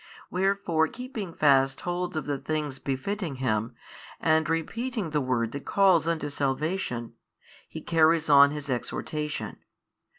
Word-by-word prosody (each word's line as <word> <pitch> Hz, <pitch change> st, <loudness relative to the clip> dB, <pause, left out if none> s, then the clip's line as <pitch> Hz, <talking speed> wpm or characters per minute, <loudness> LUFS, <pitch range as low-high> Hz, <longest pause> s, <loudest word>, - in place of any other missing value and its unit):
Wherefore 185 Hz, -4 st, +1 dB
keeping 240 Hz, -6 st, -6 dB
fast 135 Hz, -4 st, +3 dB
hold 175 Hz, -1 st, -3 dB
of 155 Hz, -, -3 dB
the 145 Hz, -2 st, -2 dB
things 150 Hz, -3 st, -3 dB
befitting 155 Hz, +4 st, -3 dB
Him, 115 Hz, -3 st, -1 dB, 0.4 s
and 160 Hz, -1 st, +2 dB
repeating 210 Hz, +4 st, -2 dB
the 150 Hz, -1 st, +1 dB
word 120 Hz, -3 st, 0 dB
that 140 Hz, +2 st, -7 dB
calls 190 Hz, -5 st, +4 dB
unto 160 Hz, -3 st, -1 dB
salvation, 135 Hz, -3 st, -2 dB, 0.6 s
He -, -, -7 dB
carries 165 Hz, -1 st, +3 dB
on 140 Hz, -1 st, +8 dB
His 145 Hz, 0 st, -6 dB
exhortation. 150 Hz, +4 st, -3 dB
155 Hz, 130 wpm, -27 LUFS, 135-175 Hz, 0.6 s, on